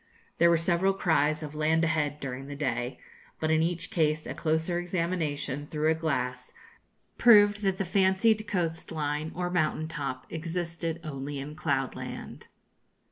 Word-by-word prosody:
There 170 - +6
were 170 - +5
several 175 +3 +2
cries 155 -4 +2
of 150 -1 -6
'land 155 +2 +2
ahead' 150 -2 0
during 135 0 -5
the 145 - -6
day, 125 -3 -2 0.4
but 155 0 0
in 160 0 +4
each 170 +1 -1
case 155 -2 +1
a - - -4
closer 160 +2 0
examination, 165 -6 -2
through 155 +1 +1
a - - +4
glass, 160 - -2 0.6
proved 205 -3 +7
that 195 -2 +1
the 195 - -1
fancied 195 +4 +3
coast 170 -5 -2
line 150 0 -2
or 180 0 -2
mountain 155 -2 0
top 140 -5 -4
existed 165 0 -3
only 140 -1 -5
in 140 +2 -6
cloud 140 -4 -1
land. - - -7
160 Hz, 155 wpm, -28 LUFS, 145-175 Hz, 0.6 s, proved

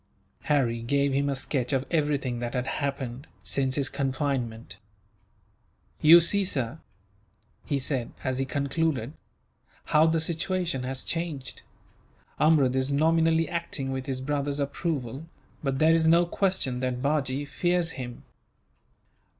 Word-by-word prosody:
Harry 125 -6 +1
gave 140 +3 +1
him 140 +1 +1
a 140 - 0
sketch 130 -2 -2
of 135 -1 0
everything 145 -6 0
that 120 +1 -4
had 125 0 -1
happened, 135 -1 -3 0.2
since 130 -1 0
his 140 -2 +1
confinement. 130 -7 -2 1.2
"You 165 +3 +9
see, 200 +4 +3
sir," 140 -5 -2 0.9
he 140 - 0
said, 130 -3 -2
as 130 0 -1
he 135 - 0
concluded, 140 -2 -1 0.7
"how 155 +1 +4
the 165 0 +2
situation 170 -2 -1
has 130 +1 -4
changed. 165 -6 -4 0.8
Amrud 145 -5 +4
is 130 +1 +1
nominally 160 +2 +3
acting 170 -6 -3
with 130 -1 -4
his 130 -1 -3
brother's 145 +1 -1
approval, 140 -1 -3 0.3
but 135 -2 -1
there 160 +3 +5
is 165 -1 +3
no 170 +2 +5
question 175 -9 0
that 125 0 -2
Bajee 140 -1 0
fears 175 +3 0
him. 125 -4 -7
140 Hz, 135 wpm, -27 LUFS, 130-160 Hz, 1.2 s, You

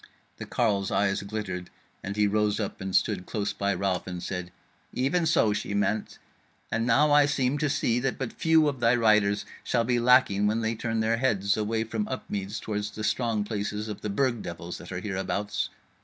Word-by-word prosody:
The - - -7
carle's 100 -5 +1
eyes 100 -1 +1
glittered, 100 -3 -5 0.3
and 100 +1 -4
he 105 0 +3
rose 105 +1 +1
up 105 - -4
and 95 -1 -3
stood 95 -4 +1
close 105 -2 -2
by 100 0 0
Ralph, 95 -2 -1
and 90 -1 -5
said: 90 -1 -4 0.4
"Even 160 +7 +1
so 110 -9 +3
she 105 0 -3
meant; 105 +1 -1 0.5
and 115 +1 0
now 145 +5 +4
I 145 0 +6
seem 140 -1 0
to 150 - +1
see 120 -2 +1
that 130 +1 -1
but 130 -3 -4
few 160 -1 +3
of 140 -3 -2
thy 120 +1 +4
riders 105 -3 +3 0.2
shall 120 - +1
be 120 +1 +1
lacking 120 -5 +4
when 110 +2 +1
they 110 0 0
turn 115 0 -2
their 115 +1 +1
heads 100 -6 +1
away 110 +1 0
from 110 -2 -3
Upmeads 105 -5 -4
towards 105 -1 -3
the 110 +1 -7
strong 115 -2 0
places 105 0 -3
of 105 -2 -6
the 105 - -3
Burg 120 +2 0
devils 85 +1 -6
that 85 - -10
are 90 0 -4
hereabouts. 100 +1 -2
105 Hz, 200 wpm, -27 LUFS, 100-120 Hz, 0.5 s, I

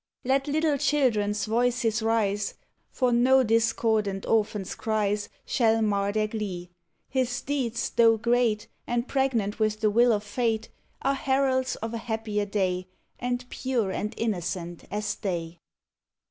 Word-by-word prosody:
Let 270 +3 +1
little 300 -1 +1
children's 210 -9 +1
voices 235 0 +1
rise, 210 -3 0 0.3
For 250 -2 +1
no 260 +2 +5
discordant 220 -3 +1
orphans 210 -3 0
cries 210 -2 -1 0.2
Shall 225 -2 +2
mar 200 -1 +1
their 215 0 +1
glee. 190 -5 -5 0.4
His 255 -1 0
deeds, 260 -5 -1
though 230 -1 +5
great, 235 -2 +1 0.2
And 240 +1 -1
pregnant 235 -7 0
with 215 -1 +1
the 215 -1 +2
will 240 +3 +5
of 210 -2 +1
fate, 220 +1 -1 0.3
Are 275 - +2
heralds 265 -1 +1
of 225 +1 -5
a 230 - -3
happier 220 -3 -2
day, 185 -3 -1 0.3
And 245 0 -2
pure 245 -7 -1
and 210 +2 -3
innocent 180 -5 -3
as 210 0 -2
they. 175 -5 -4
225 Hz, 135 wpm, -27 LUFS, 205-245 Hz, 0.4 s, no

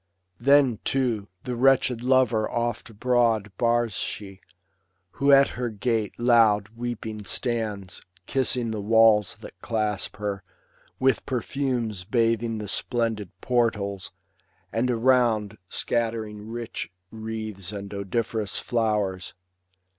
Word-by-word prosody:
Then, 135 -3 +4
too, 120 -7 0 0.2
the 125 - -3
wretched 130 -1 +3
lover 125 -4 +3
oft 120 0 -2
abroad 115 -2 +1
Bars 120 -2 +2
she, 95 0 -5 0.7
who 140 +1 +2
at 140 0 +7
her 125 -1 -3
gate 110 0 -1
loud 115 -4 +4
weeping 115 -2 -5
stands. 105 -3 -2 0.2
Kissing 125 -3 +1
the 110 -2 -3
walls 110 -1 +4
that - - -11
clasp 105 -3 -1
her; 100 -2 -3 0.6
with 130 0 +2
perfumes 125 -5 -2
Bathing 115 +1 +1
the 105 -1 -5
splendid 110 -2 -1
portals, 105 -6 0 0.6
and 115 +3 +1
around 115 -4 +2
Scattering 110 -2 -2
rich 115 -3 -5 0.2
wreaths 110 -4 -5
and 100 -1 -7
odoriferous 105 +1 -2
flowers. 105 -6 -1
115 Hz, 110 wpm, -25 LUFS, 105-120 Hz, 0.7 s, at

